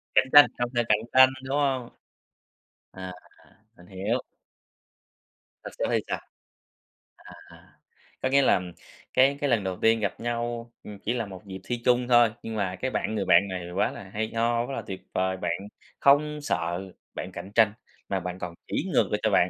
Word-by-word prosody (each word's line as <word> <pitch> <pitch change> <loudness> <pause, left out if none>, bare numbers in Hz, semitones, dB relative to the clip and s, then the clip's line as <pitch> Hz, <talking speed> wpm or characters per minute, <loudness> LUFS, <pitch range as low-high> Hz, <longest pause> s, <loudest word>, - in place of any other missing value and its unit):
Cạnh 130 - +5
tranh, 145 0 +11
không 120 0 -1
sợ 120 0 +2
cạnh 105 0 +4
tranh, 130 0 +8
đúng 135 +2 -1
hông? 135 -4 0 1.0
À, 95 -1 -7 0.6
mình 90 - -17
hiểu. 100 +6 -2 1.5
Rồi - - -7
sau - - +1
đó - - -2
thì - - +3
sao? - - -2 1.1
À, - - -11 0.9
có 130 - +1
nghĩa 140 +1 +5
là 110 -8 +4 0.5
cái 135 +2 +4
cái 145 - +1
lần 115 -5 +2
đầu 95 -1 -3
tiên 115 0 +4
gặp 100 -3 -2
nhau, 120 0 -3
ừm, 105 -2 -9
chỉ 115 - -2
là 115 -3 -2
một 95 -1 -10
dịp 95 -1 -7
thi 120 -1 -3
chung 125 0 +3
thôi. 120 -2 +5
Nhưng 110 -1 -5
mà 95 -3 -1
cái 130 0 -1
bạn 110 - -2
người 100 - -1
bạn 90 +4 +5
này 90 -2 -5
quá - - +1
là - - -9
hay 110 +1 -2
ho, 115 +1 +1
quá 135 - -5
là - - -3
tuyệt 95 - -6
vời, 95 0 0
bạn 90 -2 -2 0.5
không 150 +2 +4
sợ 90 -5 -2 0.2
bạn - - -6
cạnh 100 - -8
tranh, 110 -2 +5 0.4
mà 95 -1 0
bạn 90 +1 -6
còn 85 -1 -5
chỉ - - -2
ngược - - +4
lại - - +1
cho - - +2
bạn, - - +4
115 Hz, 195 wpm, -26 LUFS, 95-125 Hz, 1.5 s, tranh